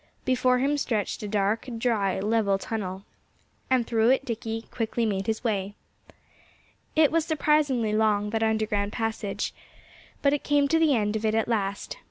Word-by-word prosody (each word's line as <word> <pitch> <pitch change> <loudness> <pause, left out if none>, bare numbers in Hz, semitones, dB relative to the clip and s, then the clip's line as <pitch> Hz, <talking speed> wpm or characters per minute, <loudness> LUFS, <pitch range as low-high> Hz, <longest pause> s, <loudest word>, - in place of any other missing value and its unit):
Before 255 -1 +3
him 285 +3 +1
stretched 215 -7 -2
a 210 - -4
dark, 205 +4 0
dry, 215 -5 0
level 205 -1 +1
tunnel. 195 -2 -5 0.6
And 255 -2 +3
through 225 0 +2
it 265 +1 +2
Dickie 225 -1 -4
quickly 230 0 -1
made 195 -1 -1
his 220 +1 -1
way. 205 -3 -1 1.2
It 310 -2 +5
was 330 -1 +2
surprisingly 290 -8 +1
long 210 -1 +2
that 225 0 -1
underground 215 -2 0
passage. 225 -3 -3 0.7
But 280 0 +4
he 290 - +1
came 290 0 +2
to 325 - +3
the 310 -4 +4
end 210 -1 0
of 220 - -2
it 220 0 +1
at 225 - +1
last. 200 -4 -2
225 Hz, 165 wpm, -26 LUFS, 210-255 Hz, 1.2 s, It